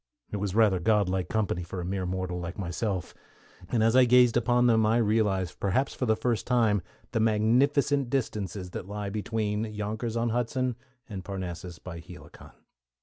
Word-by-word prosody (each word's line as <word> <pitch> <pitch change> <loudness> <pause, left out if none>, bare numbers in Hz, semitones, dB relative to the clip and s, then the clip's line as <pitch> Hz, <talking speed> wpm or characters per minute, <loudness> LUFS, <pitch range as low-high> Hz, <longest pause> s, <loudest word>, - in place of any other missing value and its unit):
It 105 - -2
was 100 -1 -3
rather 105 -5 +4
godlike 95 -2 +1
company 105 -5 0
for 90 +2 -6
a 85 - -4
mere 95 0 -2
mortal 90 -1 -3
like 90 +1 -6
myself, 95 0 -3 0.6
and 115 -3 +2
as 115 +2 +3
I 130 -1 +7
gazed 125 -1 +5
upon 120 +1 +3
them 115 -2 +4
I 110 +2 +3
realized, 105 -5 +1
perhaps 115 +8 0
for 125 - -2
the 110 - +4
first 115 -1 -1
time, 115 -5 +3 0.3
the 115 - 0
magnificent 125 +5 +2
distances 100 -8 -3
that 90 - -6
lie 100 0 -4
between 105 0 -2
Yonkers 110 +2 -3
on 115 0 +1
Hudson 125 +1 -1 0.3
and 95 -4 -6
Parnassus 90 -2 -6
by 85 -2 -8
Helicon. 85 - -13
105 Hz, 170 wpm, -28 LUFS, 95-115 Hz, 0.6 s, I